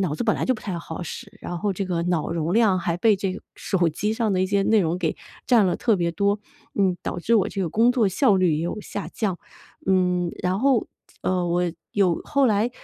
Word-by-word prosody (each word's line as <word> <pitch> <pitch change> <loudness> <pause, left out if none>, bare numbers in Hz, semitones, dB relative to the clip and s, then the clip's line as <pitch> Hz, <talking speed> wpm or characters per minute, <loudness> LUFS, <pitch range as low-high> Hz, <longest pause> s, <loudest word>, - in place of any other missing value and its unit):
脑 170 -6 0
子 - - -2
本 215 - +3
来 - - -1
就 260 - +2
不 220 - -9
太 185 -4 -3
好 165 +1 -7
使， - - -9
然 175 - -5
后 200 +3 0
这 195 +1 -3
个 175 -2 -1
脑 175 -3 0
容 165 0 -1
量 215 -5 +4
还 170 -1 -1
被 215 +3 +4
这 190 0 -3 0.2
手 175 -4 0
机 205 +7 -2
上 220 -2 0
的 185 - +1
一 - - +1
些 200 +1 +1
内 220 -1 +4
容 175 0 0
给 165 -4 -1 0.3
占 235 -5 +5
了 180 - 0
特 230 - +2
别 170 -2 0
多， 200 +3 0 0.3
嗯， 190 -3 +2
导 - - -3
致 230 +6 +2
我 200 - +2
这 195 - -4
个 175 - -1
工 235 +5 +4
作 230 -5 +2
效 200 +3 +3
率 180 -4 +3
也 160 - -2
有 175 +5 -3
下 205 -1 -6
降。 195 -5 -2 0.5
嗯， 180 -2 +2
然 185 +1 0
后， 265 -3 +2 0.3
呃 180 -1 0
我 175 +1 +1 0.3
有 190 -5 +2
后 280 -2 +2
来 215 0 +2
190 Hz, 255 characters per minute, -24 LUFS, 175-215 Hz, 0.5 s, 占